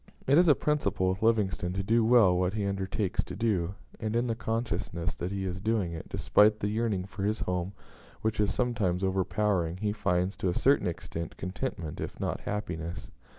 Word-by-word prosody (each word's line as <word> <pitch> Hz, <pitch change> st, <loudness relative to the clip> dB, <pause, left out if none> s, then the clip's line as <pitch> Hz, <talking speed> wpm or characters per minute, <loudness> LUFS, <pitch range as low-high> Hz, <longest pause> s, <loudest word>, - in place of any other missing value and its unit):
It 135 Hz, -, +4 dB
is 180 Hz, -, +5 dB
a 150 Hz, -, +7 dB
principle 100 Hz, -11 st, +1 dB
with 95 Hz, +1 st, -2 dB
Livingstone 100 Hz, -6 st, +1 dB
to 100 Hz, +1 st, -2 dB
do 115 Hz, +3 st, +3 dB
well 110 Hz, -6 st, +6 dB
what 90 Hz, +2 st, 0 dB
he 105 Hz, -2 st, -1 dB
undertakes 100 Hz, +1 st, -1 dB
to -, -, -7 dB
do; 100 Hz, -5 st, 0 dB, 0.2 s
and 110 Hz, 0 st, -2 dB
in 120 Hz, +1 st, +2 dB
the 115 Hz, -, 0 dB
consciousness 100 Hz, -8 st, -2 dB
that 85 Hz, +8 st, -4 dB
he 100 Hz, -1 st, -2 dB
is 95 Hz, 0 st, -4 dB
doing 105 Hz, -5 st, 0 dB
it, 80 Hz, -, -7 dB
despite 105 Hz, +1 st, +4 dB
the 105 Hz, -, -1 dB
yearning 105 Hz, -4 st, 0 dB
for 100 Hz, +1 st, -8 dB
his 105 Hz, +3 st, 0 dB
home 90 Hz, +1 st, -2 dB, 0.5 s
which 110 Hz, 0 st, 0 dB
is 105 Hz, -1 st, +2 dB
sometimes 100 Hz, -7 st, 0 dB
overpowering, 95 Hz, -2 st, +1 dB
he 105 Hz, +2 st, -1 dB
finds, 95 Hz, -2 st, 0 dB
to 95 Hz, -, 0 dB
a 90 Hz, -, -1 dB
certain 140 Hz, -5 st, +3 dB
extent, 85 Hz, -2 st, -5 dB
contentment, 90 Hz, -, -4 dB
if -, -, -6 dB
not -, -, -2 dB
happiness. 85 Hz, -5 st, -4 dB
100 Hz, 195 wpm, -29 LUFS, 90-110 Hz, 0.5 s, a